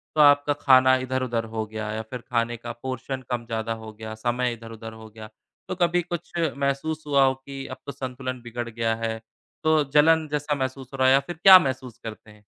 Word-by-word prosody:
तो 155 Hz, -, +4 dB
आपका 145 Hz, 0 st, +5 dB
खाना 130 Hz, -1 st, +6 dB
इधर-उधर 130 Hz, -3 st, -2 dB
हो 110 Hz, -1 st, -2 dB
गया 110 Hz, 0 st, -5 dB
या 110 Hz, +1 st, -3 dB
फिर 125 Hz, -2 st, -6 dB
खाने 120 Hz, 0 st, 0 dB
का 120 Hz, +1 st, -7 dB
पोर्शन 130 Hz, +1 st, -4 dB
कम 120 Hz, -1 st, -2 dB
ज़्यादा 115 Hz, -1 st, -2 dB
हो 110 Hz, -, -8 dB
गया, 110 Hz, 0 st, -8 dB, 0.4 s
इधर-उधर 115 Hz, -1 st, -9 dB
हो 110 Hz, 0 st, -12 dB
गया, 110 Hz, 0 st, -11 dB, 0.4 s
तो -, -, -3 dB
कभी 175 Hz, 0 st, +2 dB
कुछ 175 Hz, 0 st, -6 dB, 0.2 s
महसूस 140 Hz, +3 st, -2 dB
हुआ 140 Hz, -2 st, +4 dB
हो 130 Hz, -, +3 dB
कि, 135 Hz, 0 st, -9 dB
अब 130 Hz, -, -7 dB
तो 140 Hz, -, -5 dB
संतुलन 130 Hz, -1 st, -5 dB
बिगड़ 120 Hz, 0 st, -5 dB
गया 115 Hz, 0 st, -1 dB
है 110 Hz, 0 st, -2 dB, 0.4 s
तो 155 Hz, -1 st, +4 dB
जलन 160 Hz, +1 st, +5 dB
जैसा 150 Hz, 0 st, -1 dB
महसूस 130 Hz, -1 st, -4 dB
हो -, -, -5 dB
रहा 130 Hz, 0 st, +4 dB
या 135 Hz, +1 st, +6 dB
फिर 175 Hz, -, -5 dB
क्या 190 Hz, -1 st, +11 dB
महसूस 130 Hz, -5 st, -4 dB
करते 110 Hz, -1 st, -9 dB
हैं? 105 Hz, 0 st, -20 dB
130 Hz, 205 wpm, -25 LUFS, 115-140 Hz, 0.4 s, क्या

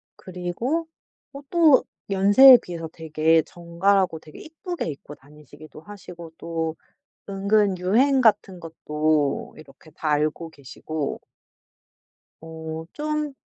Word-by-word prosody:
그리고 190 Hz, -, -4 dB, 0.5 s
어 280 Hz, -, -9 dB
또 320 Hz, -6 st, +4 dB, 0.3 s
연세에 205 Hz, +7 st, +8 dB
비해서 165 Hz, -2 st, -7 dB
되게 160 Hz, 0 st, +1 dB
정갈하고 175 Hz, +1 st, 0 dB
되게 155 Hz, -1 st, -14 dB
예쁘게 335 Hz, -, -6 dB
입고 145 Hz, 0 st, -9 dB
다니시기도 150 Hz, +2 st, -16 dB
하시고 175 Hz, -3 st, -12 dB
또 165 Hz, -1 st, -4 dB, 0.5 s
은근 200 Hz, 0 st, +1 dB
유행 255 Hz, +9 st, +2 dB
같은 205 Hz, -5 st, +1 dB
것도 155 Hz, -2 st, -2 dB
이렇게 155 Hz, +1 st, -17 dB
다 155 Hz, -, -7 dB
알고 155 Hz, +2 st, -1 dB
계시고 145 Hz, +1 st, -6 dB, 1.2 s
어 160 Hz, 0 st, -8 dB
좀 300 Hz, -1 st, -3 dB
170 Hz, 230 characters per minute, -23 LUFS, 155-205 Hz, 1.2 s, 연세에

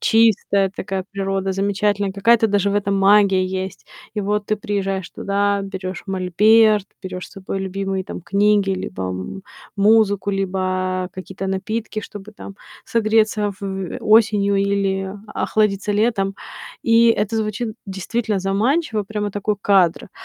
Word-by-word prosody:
чистая, 205 Hz, -3 st, +3 dB
такая 190 Hz, -1 st, -3 dB
природа 195 Hz, -1 st, -2 dB
замечательная, 200 Hz, 0 st, 0 dB
какая-то 225 Hz, +3 st, +4 dB
даже 200 Hz, -1 st, +1 dB
в -, -, -1 dB
этом 200 Hz, -1 st, 0 dB
магия 195 Hz, -1 st, +4 dB
есть. 190 Hz, +1 st, -5 dB, 0.3 s
И 210 Hz, -, -1 dB
вот 205 Hz, +1 st, -1 dB
ты 215 Hz, -, +1 dB
приезжаешь 195 Hz, -3 st, -3 dB
туда, 200 Hz, 0 st, 0 dB
берешь 190 Hz, -2 st, -6 dB
мольберт, 210 Hz, +3 st, +4 dB, 0.2 s
берешь 185 Hz, -1 st, -6 dB
с -, -, -18 dB
собой 195 Hz, 0 st, -5 dB
любимые, 195 Hz, 0 st, -3 dB
там, -, -, -7 dB
книги 200 Hz, +1 st, +2 dB
либо 95 Hz, -, -4 dB
м 95 Hz, -, -5 dB, 0.3 s
музыку, 205 Hz, -1 st, +3 dB
либо 185 Hz, -1 st, -1 dB
какие-то 190 Hz, 0 st, -6 dB
напитки, 215 Hz, +3 st, -3 dB
чтобы, 205 Hz, 0 st, -10 dB
там, 200 Hz, -1 st, -10 dB, 0.3 s
согреться 215 Hz, -2 st, +1 dB
в 190 Hz, -2 st, -4 dB
осенью 210 Hz, -2 st, +4 dB
или 195 Hz, -1 st, 0 dB
охладиться 210 Hz, -2 st, 0 dB
летом. 205 Hz, -2 st, +1 dB, 0.5 s
И 230 Hz, 0 st, +5 dB
это 215 Hz, 0 st, +1 dB
звучит 220 Hz, +1 st, -2 dB
действительно 205 Hz, +2 st, -2 dB
заманчиво. 215 Hz, -, 0 dB
Прямо 205 Hz, 0 st, -4 dB
такой 205 Hz, 0 st, -1 dB
кадр. 185 Hz, -3 st, +2 dB
200 Hz, 135 wpm, -20 LUFS, 190-210 Hz, 0.5 s, И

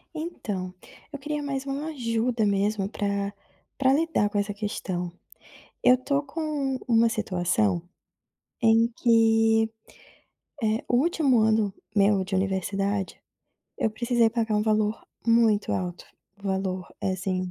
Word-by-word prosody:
Então, 205 Hz, -, -4 dB, 0.4 s
eu 285 Hz, -, -5 dB
queria 295 Hz, +1 st, -3 dB
mais 275 Hz, -1 st, -3 dB
uma 280 Hz, +3 st, -3 dB
ajuda 235 Hz, -5 st, 0 dB
mesmo 200 Hz, 0 st, +1 dB
pra 200 Hz, -1 st, -2 dB, 0.4 s
pra 265 Hz, -1 st, +4 dB
lidar 315 Hz, -8 st, +1 dB
com 205 Hz, -, -3 dB
essa 205 Hz, 0 st, 0 dB
questão. 190 Hz, -4 st, -3 dB, 0.8 s
Eu 250 Hz, -, +7 dB
tô 280 Hz, +3 st, -1 dB
com 295 Hz, -4 st, -2 dB
uma 230 Hz, -1 st, +5 dB
situação, 195 Hz, -2 st, 0 dB, 0.8 s
em 225 Hz, 0 st, +5 dB
que, 225 Hz, -1 st, +4 dB, 0.9 s
eh, 220 Hz, +1 st, 0 dB
o 245 Hz, -, +2 dB
último 285 Hz, -3 st, +3 dB
ano 215 Hz, -2 st, +2 dB, 0.2 s
meu 200 Hz, -1 st, +4 dB
de 190 Hz, +1 st, -4 dB
universidade, 195 Hz, +1 st, -1 dB, 0.6 s
eu 220 Hz, -, 0 dB
precisei 235 Hz, +1 st, +2 dB
pagar 225 Hz, -1 st, -1 dB
um 210 Hz, -, +2 dB
valor 215 Hz, 0 st, +1 dB, 0.2 s
muito 230 Hz, -3 st, +3 dB
alto, 180 Hz, -1 st, -3 dB, 0.3 s
o 200 Hz, -, -19 dB
valor 190 Hz, -1 st, -2 dB
é, -, -, 0 dB
assim, 185 Hz, -1 st, -2 dB
220 Hz, 130 wpm, -26 LUFS, 200-245 Hz, 0.9 s, Eu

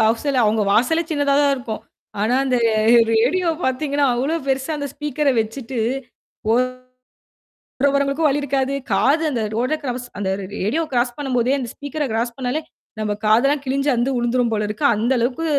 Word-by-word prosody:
வாசல்ல 235 Hz, +4 st, +2 dB
அவுங்க 215 Hz, 0 st, +2 dB
வாசலே 320 Hz, +10 st, +3 dB
சின்னதா 285 Hz, -2 st, +1 dB
தான் 285 Hz, -1 st, +3 dB
இருக்கும். 235 Hz, -4 st, -6 dB, 0.4 s
ஆனா 220 Hz, +4 st, +2 dB
அந்த 255 Hz, -2 st, +1 dB, 0.2 s
அ -, -, +2 dB, 0.3 s
ரேடியோ 295 Hz, +11 st, +2 dB, 0.2 s
பாத்தீங்கன்னா, 280 Hz, +2 st, +1 dB
அவ்வளோ 275 Hz, +7 st, 0 dB
பெருசா 270 Hz, +3 st, -1 dB
அந்த 285 Hz, -, -3 dB
ஸ்பீக்கர 295 Hz, 0 st, -1 dB
வச்சுட்டு, 235 Hz, +3 st, -5 dB, 0.7 s
ஓரமா 255 Hz, +2 st, +1 dB, 1.1 s
போற 285 Hz, -, +6 dB
வரவங்களுக்கும் 280 Hz, +3 st, +2 dB
வழி 285 Hz, +1 st, 0 dB
இருக்காது. 270 Hz, -1 st, 0 dB, 0.2 s
காது 305 Hz, +4 st, +3 dB
அந்த 240 Hz, -4 st, -1 dB
ரோட 250 Hz, +6 st, 0 dB
க்ராஸ் 250 Hz, -2 st, -4 dB
அந்த 195 Hz, -2 st, -1 dB, 0.3 s
ரேடியோ 225 Hz, +12 st, 0 dB
க்ராஸ் 245 Hz, -1 st, 0 dB
பண்ணம்போதே 260 Hz, -3 st, 0 dB
அந்த 245 Hz, -3 st, -4 dB
ஸ்பீக்கர 295 Hz, +1 st, -4 dB
க்ராஸ் 230 Hz, +2 st, -1 dB
பண்ணாலே, 260 Hz, +4 st, -2 dB, 0.4 s
நம்ப 210 Hz, -1 st, -1 dB
காதுல்லாம் 270 Hz, +7 st, +3 dB
கிழிஞ்சு 275 Hz, +2 st, 0 dB
அந்து 240 Hz, +3 st, +1 dB
விழுந்துரும் 240 Hz, 0 st, +1 dB
போல 210 Hz, -1 st, 0 dB
இருக்கு. 215 Hz, +8 st, -2 dB
அந்த 225 Hz, +4 st, 0 dB
அளவுக்கு 250 Hz, +7 st, -1 dB
260 Hz, 160 wpm, -21 LUFS, 235-285 Hz, 1.1 s, போற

